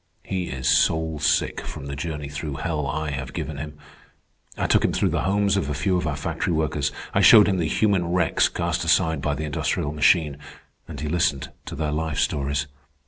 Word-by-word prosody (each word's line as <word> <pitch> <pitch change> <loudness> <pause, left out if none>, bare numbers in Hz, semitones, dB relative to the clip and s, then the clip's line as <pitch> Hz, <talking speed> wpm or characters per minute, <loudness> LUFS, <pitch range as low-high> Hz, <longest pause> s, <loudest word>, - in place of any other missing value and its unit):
"He 95 -2 -3
is 65 0 -4
soul 80 +3 +2
sick - - +1
from - - -7
the 70 0 -5
journey 75 0 -4
through 75 0 -5
hell 75 -1 -2
I 80 +2 -2
have 65 -1 -5
given 80 -2 -4
him. 75 +1 -7 0.8
I - - -1
took - - +3
him - - +1
through - - +1
the - - 0
homes 100 +1 +2
of 75 -8 -1
a 75 - -2
few 90 +6 0
of 90 -3 -1
our 75 - -1
factory 70 +4 -2
workers. 80 -3 0 0.2
I - - +3
showed 105 -2 +8
him 95 -2 +1
the 80 - 0
human 95 0 +1
wrecks 85 -3 +2
cast - - -2
aside 80 -3 +2
by 75 0 -1
the 80 +2 -4
industrial 75 0 -1
machine, 75 -1 +3 0.5
and 75 -4 -8
he 75 - -3
listened 85 -3 0 0.2
to - - -5
their 75 0 -2
life 80 0 -2
stories. 70 0 0
75 Hz, 205 wpm, -24 LUFS, 70-85 Hz, 0.8 s, showed